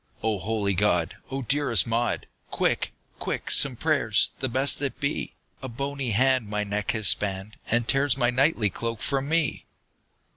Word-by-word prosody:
"O 110 -3 0
holy 105 -1 -2
God! 90 -3 0
O 135 0 -4
dearest 125 - +4
Maud, 115 +1 -1 0.2
Quick, - - -1 0.3
quick, - - -4
some - - +5
prayers, - - +1
the 130 - -2
best 135 +3 +3
that 140 -2 -4
be! 140 +1 -3 0.3
A 130 - -6
bony 140 +1 -4
hand 130 +1 +2
my 105 0 -2
neck 105 0 -3
has 110 -4 0
spanned, 100 +1 +1
And 120 0 +1
tears 135 -1 +1
my 120 -2 +1
knightly 125 - +1
cloak 115 +3 -5
from 135 0 -2
me!" 165 -2 -1
120 Hz, 160 wpm, -25 LUFS, 105-135 Hz, 0.3 s, some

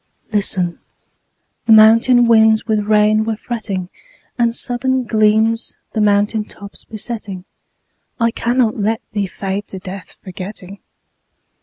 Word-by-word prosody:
Listen: 185 -4 0 0.9
the 225 - +6
mountain 230 +3 +6
winds 220 -2 +4
with 215 -2 0
rain 215 0 +3
were 220 0 -2
fretting, 210 -5 -5 0.5
And 235 -1 +1
sudden 260 +2 0
gleams 220 0 +1 0.2
the 220 - 0
mountain 210 +1 +2
tops 200 -1 -12
besetting. 210 -4 -6 0.7
I 230 -1 +2
cannot 235 -1 0
let 220 +2 -1
thee 205 -3 -2
fade 195 +2 -5
to 190 - -8
death, 185 0 -9
forgetting. 190 +1 -9
215 Hz, 120 wpm, -17 LUFS, 200-230 Hz, 0.9 s, the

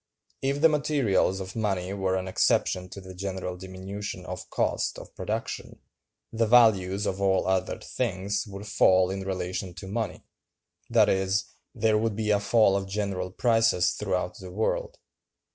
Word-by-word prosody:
If 140 +1 0
the 165 - +8
materials 140 -11 +1
of 95 -1 -7
money 95 -4 -1
were 95 -2 0
an 95 0 -2
exception 90 0 +1
to 100 - -8
the 95 0 -10
general 95 -1 -4
diminution 95 +1 -7
of 90 -1 -7
cost - - 0
of - - -11
production, - - -4 0.6
the 115 0 +1
values 105 -4 +4
of 95 0 -2
all 95 -1 +2
other 95 -1 0
things 100 +3 -2
would 100 0 -8
fall 95 -3 +4
in 95 0 -3
relation 95 -1 -4
to 90 - -8
money—that 110 +3 -2
is, 95 +1 +1 0.3
there 110 0 +2
would 110 -1 0
be 105 0 0
a 105 - +4
fall 100 -1 +4
of 100 0 -1
general 95 -2 -2
prices 115 -3 +3
throughout 90 -1 -2
the 95 - -9
world. 105 +5 -2
95 Hz, 155 wpm, -27 LUFS, 95-105 Hz, 0.6 s, the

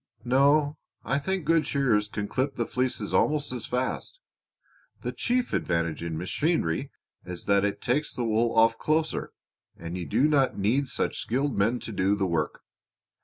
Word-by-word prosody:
"No, 145 +4 +3 0.2
I 140 - 0
think 190 +3 -2
good 165 0 +3
shearers 120 -7 +2
can 105 -1 -4
clip 135 +4 -1
the 120 - -1
fleeces 125 +2 -2
almost 150 -3 +2
as 120 -3 -5
fast. 130 - -2 0.8
The - - -3
chief 245 0 -1
advantage 85 -2 0
in 85 -1 -3
machinery 90 - 0 0.3
is 90 -1 -6
that 100 -1 +3
it 100 0 -2
takes 145 +5 0
the 120 - -3
wool 115 +1 +1
off 115 0 +5
closer, 155 +1 0 0.5
and 85 +1 -6
you 90 -3 -4
do 135 - +3
not 140 -4 +2
need 120 +8 +1
such - - -2
skilled 135 +4 -1
men 110 +5 +2
to - - -6
do 100 0 +1
the 100 -2 0
work. 85 -4 -1
120 Hz, 170 wpm, -27 LUFS, 100-145 Hz, 0.8 s, off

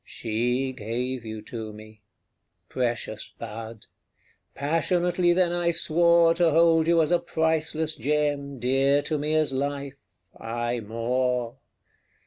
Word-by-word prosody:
She 125 +4 -2
gave 125 +2 -4
you 110 -1 -7
to 110 -1 -6
me. 110 0 -14 0.7
Precious 120 -3 -3
bud! 115 0 -8 0.7
Passionately 175 +4 +1
then 175 0 +2
I 175 0 0
swore 170 0 +4
To 170 0 +3
hold 165 0 +4
you 165 -1 +4
as 155 - -1
a 175 - +4
priceless 160 -1 0
gem, 145 +1 -1
Dear 135 +3 +2
to 155 -2 -2
me 150 +2 -1
as 155 -3 +2
life 140 0 -3 0.4
aye 120 +1 -3
more! 120 +2 -2
140 Hz, 120 wpm, -25 LUFS, 120-160 Hz, 0.7 s, swore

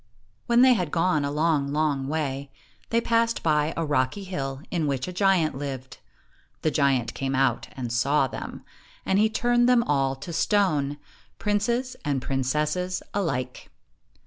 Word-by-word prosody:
i - - -39
io 115 -1 -38
When 235 0 +5
they 260 -1 +7
had 180 -8 -1
gone 165 -2 +1
a 140 - -1
long, 150 -1 +1
long 145 -3 0
way, 140 -2 -2 0.4
they 230 - +2
passed 230 0 +1
by 150 -1 +2
a 165 - 0
rocky 145 +6 0
hill 135 -7 -4
in 165 -4 0
which 135 0 -1
a 180 - -5
giant 185 -4 +2
lived. 135 -2 -6 0.6
The 155 - +2
giant 135 -5 +1
came 135 0 -2
out 130 -3 +1
and 120 -3 -4
saw 135 +4 +2
them, 130 - -7 0.4
and 190 - +2
he 215 +1 +4
turned 240 +2 +2
them 245 -2 +5
all 135 -5 +1
to 170 +6 -8
stone, 155 -8 +1 0.4
princes 235 +5 0
and 145 -3 0
princesses 150 +8 -1
alike. 130 -11 -3
150 Hz, 165 wpm, -25 LUFS, 135-190 Hz, 0.6 s, they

